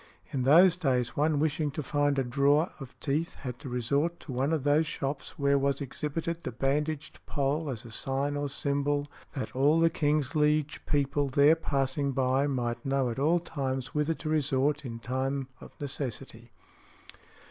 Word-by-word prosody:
In 135 Hz, -4 st, -1 dB
those 165 Hz, +7 st, +6 dB
days 130 Hz, -8 st, 0 dB
one 150 Hz, +1 st, +2 dB
wishing 150 Hz, 0 st, +1 dB
to 150 Hz, +2 st, -4 dB
find 145 Hz, +1 st, +1 dB
a 135 Hz, -, +2 dB
drawer 140 Hz, +6 st, +2 dB
of 135 Hz, -3 st, -10 dB
teeth 155 Hz, +4 st, -1 dB
had 125 Hz, -2 st, -7 dB
to 135 Hz, -, -7 dB
resort 140 Hz, +8 st, 0 dB
to 145 Hz, -, -8 dB
one 130 Hz, +4 st, 0 dB
of 155 Hz, -4 st, 0 dB
those 150 Hz, +2 st, +3 dB
shops 140 Hz, -3 st, -4 dB
where 140 Hz, -1 st, +3 dB
was 140 Hz, 0 st, +1 dB
exhibited 155 Hz, +4 st, -3 dB
the -, -, -4 dB
bandaged 145 Hz, +5 st, -2 dB
pole 145 Hz, +2 st, -1 dB
as 120 Hz, -3 st, -5 dB
a 115 Hz, -, -10 dB
sign 135 Hz, +5 st, -1 dB
or 145 Hz, 0 st, -2 dB
symbol 145 Hz, +1 st, 0 dB, 0.3 s
that 130 Hz, -, -5 dB
"all 145 Hz, +5 st, +4 dB
the 165 Hz, 0 st, +4 dB
King's 150 Hz, -2 st, +1 dB
liege 150 Hz, -1 st, +1 dB
people 145 Hz, 0 st, +1 dB
there 140 Hz, +4 st, +5 dB
passing 140 Hz, -2 st, -1 dB
by 130 Hz, +2 st, +2 dB
might 120 Hz, -4 st, -2 dB
know 135 Hz, -2 st, +1 dB
at 115 Hz, -, -5 dB
all 160 Hz, +5 st, +3 dB
times 135 Hz, -6 st, -4 dB
whither 150 Hz, +2 st, +1 dB
to 155 Hz, -, -7 dB
resort 150 Hz, -1 st, +1 dB
in 115 Hz, -2 st, -5 dB
time 130 Hz, +3 st, -2 dB
of -, -, -11 dB
necessity." 130 Hz, -4 st, -6 dB
140 Hz, 175 wpm, -29 LUFS, 135-150 Hz, 0.3 s, those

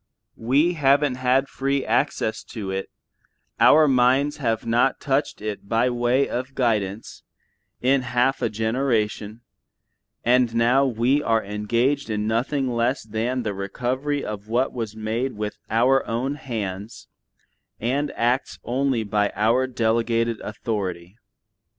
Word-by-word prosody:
We 140 Hz, +9 st, +2 dB
haven't 140 Hz, -3 st, +2 dB
had 130 Hz, +2 st, +2 dB
free 135 Hz, 0 st, -1 dB
access 115 Hz, -1 st, 0 dB
to 100 Hz, -5 st, -6 dB
it, 95 Hz, 0 st, -3 dB, 0.7 s
our 155 Hz, +1 st, +6 dB
minds 130 Hz, +2 st, +3 dB
have 115 Hz, -5 st, -1 dB
not 120 Hz, +3 st, +2 dB
touched 140 Hz, -5 st, -1 dB
it 105 Hz, -1 st, -5 dB
by 120 Hz, +2 st, +2 dB
way 120 Hz, +3 st, +1 dB
of 130 Hz, +2 st, -4 dB
guidance, 110 Hz, -4 st, -1 dB, 0.6 s
in 130 Hz, +2 st, +3 dB
half 125 Hz, +2 st, 0 dB
a -, -, +1 dB
generation, 110 Hz, -1 st, -1 dB, 0.8 s
and 120 Hz, -1 st, +3 dB
now 125 Hz, +4 st, +3 dB
we 125 Hz, +4 st, +1 dB
are 115 Hz, -4 st, +1 dB
engaged 115 Hz, +7 st, 0 dB
in 105 Hz, -1 st, -1 dB
nothing 130 Hz, +5 st, 0 dB
less 120 Hz, +2 st, 0 dB
than 115 Hz, +4 st, -2 dB
the 105 Hz, -2 st, -2 dB
recovery 125 Hz, +9 st, -2 dB
of 105 Hz, -1 st, -6 dB
what 120 Hz, +4 st, 0 dB
was 115 Hz, -3 st, -4 dB
made 110 Hz, +4 st, -2 dB
with 105 Hz, 0 st, -5 dB
our 125 Hz, +5 st, +3 dB
own 125 Hz, +5 st, -1 dB
hands, 105 Hz, -, -6 dB, 0.7 s
and 135 Hz, +6 st, -1 dB
acts 120 Hz, +3 st, 0 dB
only 130 Hz, -1 st, 0 dB
by 105 Hz, 0 st, 0 dB
our 115 Hz, +5 st, +2 dB
delegated 115 Hz, -1 st, 0 dB
authority. 95 Hz, -4 st, -4 dB
120 Hz, 130 wpm, -23 LUFS, 110-135 Hz, 0.8 s, our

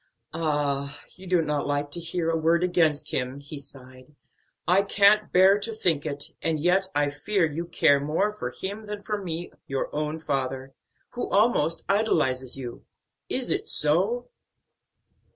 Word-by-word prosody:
"Ah, 145 Hz, -3 st, -1 dB, 0.2 s
you 185 Hz, +1 st, -12 dB
do 180 Hz, -2 st, +3 dB
not 150 Hz, -2 st, -1 dB
like 145 Hz, 0 st, -1 dB
to 170 Hz, -, -4 dB
hear 165 Hz, 0 st, -1 dB
a -, -, 0 dB
word 165 Hz, +2 st, +2 dB
against 165 Hz, -5 st, +2 dB
him!" 130 Hz, +2 st, -2 dB
he 145 Hz, +1 st, -8 dB
sighed; 130 Hz, 0 st, -13 dB, 0.5 s
"I 185 Hz, +3 st, +5 dB
can't 200 Hz, +1 st, +4 dB
bear 190 Hz, +2 st, +6 dB
to 225 Hz, +2 st, -3 dB
think 160 Hz, -8 st, +1 dB
it, 145 Hz, -1 st, -4 dB
and 160 Hz, -2 st, 0 dB
yet 180 Hz, +4 st, +2 dB
I 145 Hz, 0 st, +2 dB
fear 180 Hz, +5 st, 0 dB
you 160 Hz, +2 st, -4 dB
care 145 Hz, -4 st, +4 dB
more 155 Hz, +9 st, 0 dB
for 210 Hz, -, -5 dB
him 205 Hz, +3 st, -6 dB
than 205 Hz, -1 st, -6 dB
for 210 Hz, 0 st, -3 dB
me, 175 Hz, -1 st, -5 dB, 0.2 s
your 135 Hz, 0 st, -3 dB
own 150 Hz, +1 st, -1 dB
father, 135 Hz, -3 st, -3 dB, 0.4 s
who 245 Hz, -, -4 dB
almost 195 Hz, -7 st, +2 dB
idolizes 135 Hz, -, +1 dB
you. 125 Hz, -3 st, -7 dB, 0.5 s
Is -, -, 0 dB
it -, -, +1 dB
so?" 190 Hz, +11 st, +1 dB
160 Hz, 160 wpm, -26 LUFS, 145-190 Hz, 0.5 s, bear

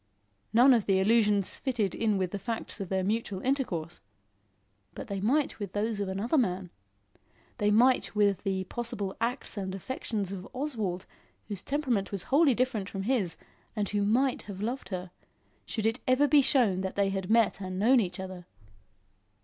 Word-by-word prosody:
None 245 Hz, +5 st, +7 dB
of 230 Hz, -4 st, +1 dB
the 195 Hz, -1 st, +3 dB
allusions 210 Hz, -1 st, +2 dB
fitted 235 Hz, -8 st, -1 dB
in 215 Hz, -3 st, +1 dB
with 185 Hz, -2 st, -1 dB
the 200 Hz, -, -4 dB
facts 225 Hz, 0 st, -5 dB
of 190 Hz, -, -5 dB
their 190 Hz, -1 st, 0 dB
mutual 205 Hz, -1 st, -1 dB
intercourse. 180 Hz, -, -2 dB, 0.9 s
But -, -, -7 dB
they 195 Hz, -1 st, -3 dB
might 270 Hz, +7 st, +1 dB
with 200 Hz, -3 st, -5 dB
those 215 Hz, +1 st, -1 dB
of 200 Hz, -1 st, -2 dB
another 215 Hz, +10 st, +1 dB
man; 185 Hz, -6 st, -1 dB, 0.9 s
they 210 Hz, -, +2 dB
might 240 Hz, +3 st, +3 dB
with 205 Hz, -2 st, +3 dB
the 190 Hz, -2 st, -1 dB
possible 200 Hz, -1 st, -3 dB
acts 235 Hz, -1 st, -2 dB
and 190 Hz, -1 st, -3 dB
affections 205 Hz, -2 st, -4 dB
of 195 Hz, -1 st, -6 dB
Oswald 220 Hz, -10 st, -3 dB, 0.4 s
whose 200 Hz, -3 st, -4 dB
temperament 255 Hz, -9 st, -1 dB
was 195 Hz, -3 st, -3 dB
wholly 285 Hz, -3 st, +5 dB
different 235 Hz, -5 st, -1 dB
from 195 Hz, -1 st, -4 dB
his 205 Hz, -8 st, 0 dB, 0.4 s
and 210 Hz, -2 st, -1 dB
who 205 Hz, -1 st, 0 dB
might 250 Hz, +6 st, +2 dB
have 200 Hz, -2 st, -8 dB
loved 240 Hz, +6 st, -3 dB
her, 180 Hz, -2 st, -5 dB, 0.6 s
should 220 Hz, -2 st, -3 dB
it 225 Hz, +2 st, +1 dB
ever 255 Hz, +3 st, +4 dB
be 290 Hz, 0 st, +6 dB
shown 230 Hz, -9 st, +2 dB
that 190 Hz, 0 st, -4 dB
they 200 Hz, -1 st, +2 dB
had 190 Hz, -1 st, -3 dB
met 225 Hz, -2 st, +3 dB
and 185 Hz, -1 st, -4 dB
known 240 Hz, +6 st, +5 dB
each 180 Hz, -4 st, -2 dB
other. 185 Hz, -2 st, -7 dB
205 Hz, 175 wpm, -29 LUFS, 190-240 Hz, 0.9 s, None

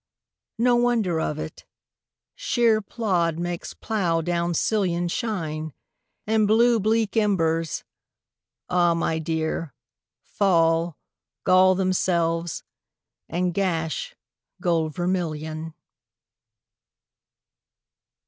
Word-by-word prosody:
No 240 Hz, +1 st, +3 dB
wonder 230 Hz, -9 st, +1 dB
of 150 Hz, -, -2 dB
it: 155 Hz, 0 st, -7 dB, 0.7 s
shéer 230 Hz, -3 st, +2 dB
plód 185 Hz, -7 st, -1 dB
makes 175 Hz, 0 st, -4 dB
plough 180 Hz, -7 st, 0 dB
down 170 Hz, +1 st, -1 dB
sillion 175 Hz, -3 st, +1 dB
Shine, 160 Hz, -, -3 dB, 0.5 s
and 215 Hz, -1 st, +2 dB
blue 230 Hz, +2 st, +4 dB
bleak 220 Hz, +1 st, +1 dB
embers, 165 Hz, -7 st, +1 dB, 0.8 s
ah 175 Hz, -1 st, +3 dB
my 165 Hz, -1 st, 0 dB
dear, 160 Hz, -2 st, -2 dB, 0.5 s
Fall, 165 Hz, -4 st, +2 dB, 0.5 s
gall 185 Hz, 0 st, +5 dB
themselves, 170 Hz, -3 st, 0 dB, 0.7 s
and 180 Hz, 0 st, -1 dB
gash 165 Hz, -5 st, -2 dB, 0.4 s
gold 165 Hz, -4 st, 0 dB
vermillion. 160 Hz, -3 st, -3 dB
175 Hz, 80 wpm, -24 LUFS, 165-205 Hz, 0.8 s, gall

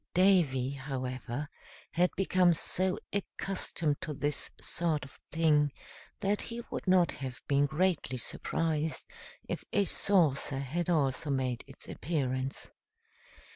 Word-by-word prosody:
Davy, 165 Hz, -9 st, +4 dB
however, 130 Hz, 0 st, -4 dB, 0.4 s
had 180 Hz, +1 st, +3 dB
become 185 Hz, -2 st, +4 dB
so 185 Hz, +3 st, +1 dB, 0.2 s
accustomed 185 Hz, -6 st, -1 dB
to 150 Hz, -, -4 dB
this 145 Hz, +1 st, +1 dB
sort 160 Hz, -5 st, 0 dB
of 135 Hz, -, -15 dB
thing 150 Hz, -3 st, +3 dB, 0.5 s
that 205 Hz, +1 st, +1 dB
he 235 Hz, 0 st, -5 dB
would -, -, -4 dB
not 185 Hz, -2 st, +5 dB
have 130 Hz, -2 st, -6 dB
been 140 Hz, 0 st, +3 dB
greatly 155 Hz, -4 st, 0 dB
surprised 155 Hz, +5 st, -1 dB, 0.4 s
if -, -, -3 dB
a 205 Hz, -, +3 dB
saucer 160 Hz, -9 st, +2 dB
had 155 Hz, +6 st, -2 dB
also 145 Hz, -3 st, +1 dB
made 130 Hz, -3 st, 0 dB
its 135 Hz, -, -11 dB
appearance. 135 Hz, -4 st, -2 dB
150 Hz, 120 wpm, -31 LUFS, 135-180 Hz, 0.5 s, not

